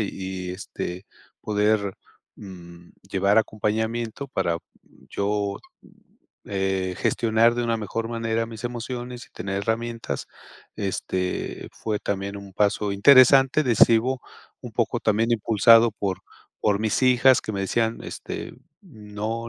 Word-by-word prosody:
y 105 Hz, -, -1 dB
y, 95 Hz, -1 st, -5 dB
este, 90 Hz, 0 st, -6 dB, 0.3 s
poder 105 Hz, -2 st, +1 dB, 0.4 s
mm, 85 Hz, -3 st, -12 dB, 0.2 s
llevar 100 Hz, +3 st, +3 dB
acompañamiento 110 Hz, +4 st, -2 dB
para 90 Hz, -9 st, -1 dB, 0.5 s
yo 100 Hz, 0 st, -1 dB, 0.9 s
eh, 95 Hz, -2 st, -1 dB
gestionar 115 Hz, +1 st, +2 dB
de 120 Hz, -, -1 dB
una 115 Hz, -1 st, 0 dB
mejor 115 Hz, +2 st, -4 dB
manera 115 Hz, -1 st, -1 dB
mis 115 Hz, 0 st, -10 dB
emociones 120 Hz, 0 st, -5 dB
y -, -, -29 dB
tener 95 Hz, +2 st, -4 dB
herramientas. 115 Hz, +2 st, -3 dB, 0.5 s
Este 95 Hz, -2 st, -3 dB
fue 105 Hz, -2 st, -3 dB
también 100 Hz, 0 st, -3 dB
un 100 Hz, -1 st, -10 dB
paso 105 Hz, 0 st, +1 dB
interesante, 135 Hz, +6 st, +6 dB
decido, 120 Hz, +1 st, +4 dB, 0.4 s
un -, -, -9 dB
poco -, -, 0 dB
también 110 Hz, +2 st, +1 dB
impulsado 115 Hz, +1 st, +5 dB
por 95 Hz, -3 st, -3 dB, 0.4 s
por 105 Hz, 0 st, +1 dB
mis 110 Hz, -1 st, 0 dB
hijas 130 Hz, 0 st, +5 dB
que 110 Hz, -, -5 dB
me 100 Hz, -, -3 dB
decían, 115 Hz, +3 st, -1 dB
este: -, -, -7 dB, 0.3 s
"No 110 Hz, +2 st, -6 dB
110 Hz, 125 wpm, -24 LUFS, 100-115 Hz, 0.9 s, interesante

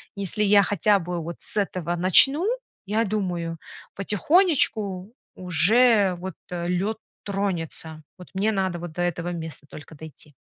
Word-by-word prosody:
Если 200 Hz, +1 st, -3 dB
я 200 Hz, 0 st, +5 dB
хотя 205 Hz, +1 st, +2 dB
бы 175 Hz, 0 st, -4 dB
вот 170 Hz, +1 st, -7 dB
с -, -, -7 dB
этого 180 Hz, -4 st, -1 dB
начну, 270 Hz, -, +5 dB, 0.4 s
я 215 Hz, +3 st, 0 dB
думаю, 180 Hz, -5 st, -3 dB, 0.4 s
потихонечку 210 Hz, -, +1 dB, 0.2 s
уже, 195 Hz, +4 st, +3 dB
вот, 185 Hz, -2 st, -6 dB, 0.2 s
э, 175 Hz, -1 st, -3 dB
лёд 195 Hz, +5 st, -1 dB, 0.3 s
тронется, 165 Hz, -5 st, -3 dB
вот 180 Hz, -, -13 dB
мне 200 Hz, +3 st, +1 dB
надо 190 Hz, -3 st, -1 dB
вот 175 Hz, -2 st, -7 dB
до 175 Hz, -, -4 dB
этого 175 Hz, 0 st, -2 dB
места 160 Hz, -3 st, -8 dB
только 155 Hz, +1 st, -12 dB
дойти. 150 Hz, 0 st, -13 dB
185 Hz, 145 wpm, -24 LUFS, 170-205 Hz, 0.4 s, я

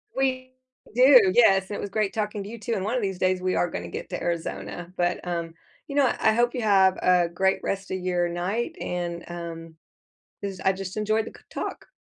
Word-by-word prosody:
We 255 Hz, -1 st, -1 dB, 0.4 s
do, 250 Hz, -6 st, +7 dB
yes 195 Hz, -5 st, +5 dB
and 205 Hz, -, -4 dB
it -, -, -4 dB
was 200 Hz, -, -4 dB
great 210 Hz, 0 st, 0 dB
talking 210 Hz, -2 st, -2 dB
to 200 Hz, -, -8 dB
you, 230 Hz, 0 st, -8 dB
too, 230 Hz, +2 st, -3 dB
and 190 Hz, -, -1 dB
one 220 Hz, +4 st, -1 dB
of 250 Hz, -, 0 dB
these 195 Hz, -3 st, -2 dB
days, 185 Hz, 0 st, +1 dB
we 185 Hz, 0 st, 0 dB
are 175 Hz, -, +1 dB
gonna -, -, -5 dB
get -, -, -6 dB
to -, -, -3 dB
Arizona 170 Hz, +1 st, -4 dB
but, 175 Hz, 0 st, -1 dB
um, 170 Hz, -1 st, -3 dB, 0.3 s
you 280 Hz, -, -6 dB
know? 275 Hz, -4 st, +4 dB
I 220 Hz, -, +4 dB
hope 240 Hz, +1 st, +2 dB
you 250 Hz, -, -2 dB
have 195 Hz, -3 st, +4 dB
a 180 Hz, -1 st, +4 dB
great 190 Hz, +3 st, +1 dB
rest 195 Hz, 0 st, -3 dB
of 185 Hz, -, -1 dB
your 180 Hz, -1 st, 0 dB
night, 195 Hz, -, -2 dB
and, 175 Hz, -1 st, -3 dB
um 165 Hz, -1 st, -7 dB, 0.7 s
'cause 195 Hz, -2 st, -5 dB
I 190 Hz, -, +3 dB
just 190 Hz, +1 st, -6 dB
enjoyed 215 Hz, +1 st, +1 dB
the -, -, -9 dB
c -, -, -21 dB
talk. -, -, -5 dB
195 Hz, 225 wpm, -25 LUFS, 175-220 Hz, 0.7 s, do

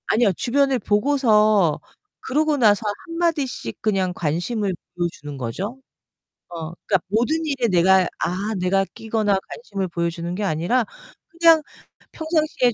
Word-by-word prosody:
아니요, 220 Hz, -2 st, +3 dB
주변을 270 Hz, -, +1 dB
보고서 215 Hz, -, +3 dB, 0.4 s
그러고 300 Hz, +2 st, 0 dB
나서 215 Hz, -5 st, +4 dB, 0.3 s
한마디씩 330 Hz, -, -2 dB
그냥 195 Hz, -4 st, 0 dB
관심을 180 Hz, +6 st, -1 dB, 0.2 s
보여 175 Hz, -1 st, 0 dB
주는 145 Hz, -2 st, -9 dB
거죠. 180 Hz, -, -4 dB, 0.7 s
어 165 Hz, -2 st, -6 dB
그러니까 190 Hz, -3 st, +2 dB
모든 235 Hz, +10 st, +1 dB
일에 270 Hz, -5 st, 0 dB
내가, 185 Hz, 0 st, +4 dB
아 195 Hz, +5 st, -2 dB
내가 195 Hz, +2 st, +2 dB
끼거나 220 Hz, -3 st, 0 dB
관심을 200 Hz, -5 st, -4 dB
보여 170 Hz, -1 st, -1 dB
주는 170 Hz, +1 st, -5 dB
게 210 Hz, -, -3 dB
아니라 190 Hz, +8 st, +1 dB, 0.4 s
그냥 335 Hz, -3 st, +5 dB, 0.5 s
펴 320 Hz, -, -7 dB
평상시에 310 Hz, -6 st, +1 dB
210 Hz, 300 characters per minute, -22 LUFS, 180-260 Hz, 0.7 s, 그냥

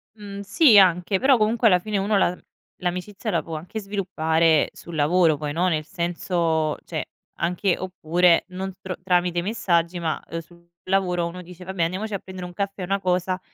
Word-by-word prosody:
Mh, 200 Hz, -2 st, -8 dB
sì 220 Hz, +3 st, +5 dB
anche, 185 Hz, 0 st, +4 dB
però 265 Hz, 0 st, +5 dB
comunque 225 Hz, +2 st, +2 dB
alla 180 Hz, -4 st, +5 dB
fine 210 Hz, +3 st, -3 dB
uno 200 Hz, +2 st, +1 dB
la 180 Hz, -2 st, +2 dB, 0.4 s
l'amicizia 180 Hz, +3 st, -3 dB
la 170 Hz, -, +1 dB
può 160 Hz, +1 st, -7 dB
anche 175 Hz, +8 st, -6 dB
sviluppare 165 Hz, -6 st, +1 dB
sul 170 Hz, -, -10 dB
lavoro. 160 Hz, +1 st, +3 dB
Poi 145 Hz, 0 st, -4 dB
no, 180 Hz, +3 st, +1 dB
nel 155 Hz, -3 st, -1 dB
senso 170 Hz, -3 st, -1 dB
cioè, -, -, -4 dB, 0.3 s
anche 180 Hz, +2 st, 0 dB
oppure 175 Hz, -1 st, +2 dB
non 190 Hz, +1 st, -5 dB
tro 185 Hz, -1 st, -5 dB
tramite 180 Hz, -1 st, +1 dB
messaggi, 175 Hz, -4 st, 0 dB
ma, 160 Hz, -2 st, -2 dB
ehm, 165 Hz, -, -4 dB
sul 170 Hz, +1 st, -21 dB, 0.2 s
lavoro 185 Hz, -2 st, +1 dB
uno 180 Hz, +2 st, -7 dB
dice: 180 Hz, 0 st, -12 dB
"Vabbè, 185 Hz, -1 st, -2 dB
andiamoci 190 Hz, +6 st, -2 dB
a 200 Hz, -, -1 dB
prendere 185 Hz, -1 st, -8 dB
un 175 Hz, -, -11 dB
caffè, 195 Hz, 0 st, -3 dB
una 195 Hz, +2 st, 0 dB
cosa", 185 Hz, 0 st, 0 dB
180 Hz, 180 wpm, -23 LUFS, 170-195 Hz, 0.4 s, sì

